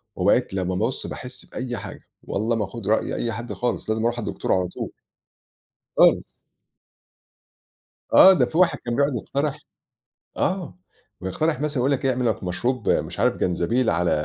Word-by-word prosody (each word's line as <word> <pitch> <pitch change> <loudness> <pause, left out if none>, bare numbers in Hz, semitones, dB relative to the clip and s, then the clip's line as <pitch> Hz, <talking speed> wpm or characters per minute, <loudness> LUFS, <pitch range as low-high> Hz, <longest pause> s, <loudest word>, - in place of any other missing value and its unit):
وبقيت 100 +5 +2
لمّا 95 -1 -1
بُص 115 +7 -2
باحس 125 0 -8
بأي 125 -2 -5
حاجة، - - -8 0.2
والله 110 +4 -1
ما 110 -2 0
آخُد 100 +1 -8
رأي 110 +1 +1
أي 120 - -1
حد 120 +2 -5
خالص، 120 -3 -2
لازم 110 0 0
أروح 120 +1 0
على 110 - -4
الدكتور - - -1
على 90 -1 +1
طول. - - -6 1.0
خالص. - - +5 1.9
آه، 190 - +9
ده 135 -9 +3
في 160 - -4
واحد 185 0 +4
كان 120 0 -1
بيقعد 140 -1 +2
يقترح 140 +5 -2 0.8
آه، 180 - -1 0.4
ويقترح 145 - -1
مثلًا 150 -1 -1
يقول 130 +3 +2
لك 135 0 0
إيه، 135 - +4
اعمل 125 -1 0
لك 105 - -3
مشروب 120 +6 -1
مش - - 0
عارف - - +3
جنزبيل 110 +8 +1
على 85 -1 +1
120 Hz, 170 wpm, -24 LUFS, 105-135 Hz, 1.9 s, آه